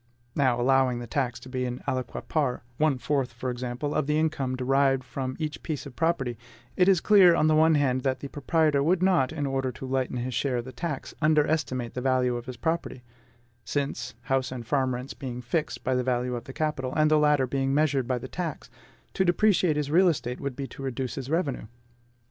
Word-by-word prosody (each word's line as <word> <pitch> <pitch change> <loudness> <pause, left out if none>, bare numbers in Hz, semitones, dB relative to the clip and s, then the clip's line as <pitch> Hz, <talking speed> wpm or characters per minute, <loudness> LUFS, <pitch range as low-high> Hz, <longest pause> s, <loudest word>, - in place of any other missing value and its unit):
Now, 130 -4 +2
allowing 130 0 +3
the 120 - -5
tax 125 0 -2
to - - -11
be 130 0 -3
an 125 0 -5
aliquot 130 -2 -3
part 140 -7 0
one 155 -3 +2
fourth 135 -2 -1
for 125 +2 -3
example 125 +4 -3
of - - 0
the 150 0 +2
income 145 -5 0
derived 135 +1 +2
from 130 0 -4
each 155 -2 -4
piece 155 -4 -4
of 135 -3 -10
property, 135 -8 0 0.4
it 180 - +4
is 190 -3 +5
clear 190 -5 +6
on 155 - +2
the 155 - +4
one 160 +1 +5
hand 130 -3 +2
that 130 0 -1
the 140 - -6
proprietor 150 0 +1
would 175 +5 +2
not, 175 -9 +3
in 150 -2 -3
order 135 -1 -1
to - - -8
lighten 130 -1 -1
his 125 +1 -3
share 130 +1 0
of 120 - -3
the 130 - -7
tax, 140 +3 -5
underestimate 150 -5 +1
the 125 - -4
value 130 -1 +2
of 120 +1 -6
his 130 -2 -6
property; 160 -3 -2 0.6
since, 140 +6 -3
house 135 -1 0
and 125 -3 -6
farm 130 -1 +1
rents 125 +2 -6
being 125 -4 -6
fixed 135 +6 -2
by 130 - 0
the 125 0 +1
value 125 0 0
of 120 - -5
the - - -8
capital, 135 -4 -2
and 155 0 +3
the 155 - +5
latter 150 -3 +3
being 135 +1 -1
measured 140 -3 +2
by 130 -1 0
the 125 - -6
tax, 165 -6 -5 0.4
to 190 - +2
depreciate 180 -2 +3
his 145 -1 -2
real 180 +4 +5
estate 125 -6 -1
would 140 -2 -3
be 140 - -4
to 135 - -10
reduce 130 -1 -3
his 135 -1 -6
revenue. 150 -8 -1
135 Hz, 220 wpm, -27 LUFS, 125-155 Hz, 0.6 s, clear